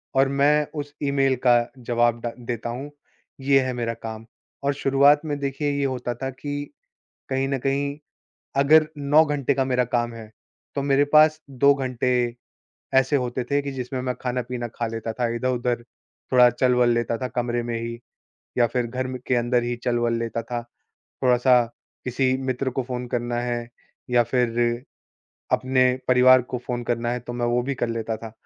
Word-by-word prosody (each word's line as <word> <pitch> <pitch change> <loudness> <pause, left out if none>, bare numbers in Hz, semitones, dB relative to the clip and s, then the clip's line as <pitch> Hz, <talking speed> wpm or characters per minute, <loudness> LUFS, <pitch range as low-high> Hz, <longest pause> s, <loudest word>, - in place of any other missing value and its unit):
और 135 0 +4
मैं 145 +2 +3
उस 145 -1 -6
ईमेल 135 -1 +2
का 120 -1 +7 0.2
जवाब 120 -1 +1
डा 120 - -3
देता 120 -1 -4
हूँ, 135 +5 -6 0.5
ये 135 0 +4
है 130 -1 -2
मेरा 115 -1 -2
काम। 110 -1 -8 0.4
और 140 0 +1
शुरुआत 140 +1 +4
में 145 -2 -2
देखिए 140 +1 -1
ये 140 - +1
होता 125 -2 -2
था 135 +3 -4
कि 145 +2 -5 0.7
कहीं 135 0 0
न 135 - 0
कहीं 140 +2 -1 0.6
अगर 155 +3 +6
9 145 +3 +4
घंटे 145 -2 0
का 135 0 0
मेरा 125 -1 +2
काम 120 0 -1
है 110 -1 -10 0.4
तो 140 - 0
मेरे 140 0 +3
पास 155 +1 +6
2 140 +2 +4
घंटे 130 -2 -2 0.9
ऐसे 135 +2 +3
होते 125 -1 -1
थे 145 0 +3
कि 140 0 -5
जिसमें 130 0 -4
मैं 125 0 -1
खाना-पीना 125 -1 -3
खा 115 - -2
लेता 115 0 -4
था। 120 0 -1
इधर-उधर 125 -1 -1 0.5
थोड़ा 125 -1 +7
चल-वल 125 0 +2
लेता 115 0 0
था 130 +2 -3
कमरे 120 0 0
में 120 0 -3
ही 115 0 -5 0.6
या 120 - +5
फ़िर 120 +1 -1
घर 130 +2 -3
म 130 - -4
के 130 - +2
अंदर 120 0 +1
ही 120 0 -2
चल-वल 120 -1 +1
लेता 115 0 -3
था। 120 +1 -4 0.6
थोड़ा 125 -1 +5
सा 125 0 +5 0.4
किसी 130 +1 +1
मित्र 130 +1 -1
को 130 0 -2
फ़ोन 125 0 -5
करना 120 0 -1
है 120 -1 -3 0.4
या 120 -1 +4
फ़िर 120 0 0 0.7
अपने 130 0 +3 0.2
परिवार 130 0 +6
को - - +1
फ़ोन 120 -1 -2
करना 120 0 -1
है 125 - -2
तो 120 0 -8
मैं 120 0 -1
वो 120 +1 +1
भी 140 +2 -2
कर 120 - -2
लेता 115 -1 -3
था। 115 -1 -9
125 Hz, 185 wpm, -24 LUFS, 120-135 Hz, 0.9 s, का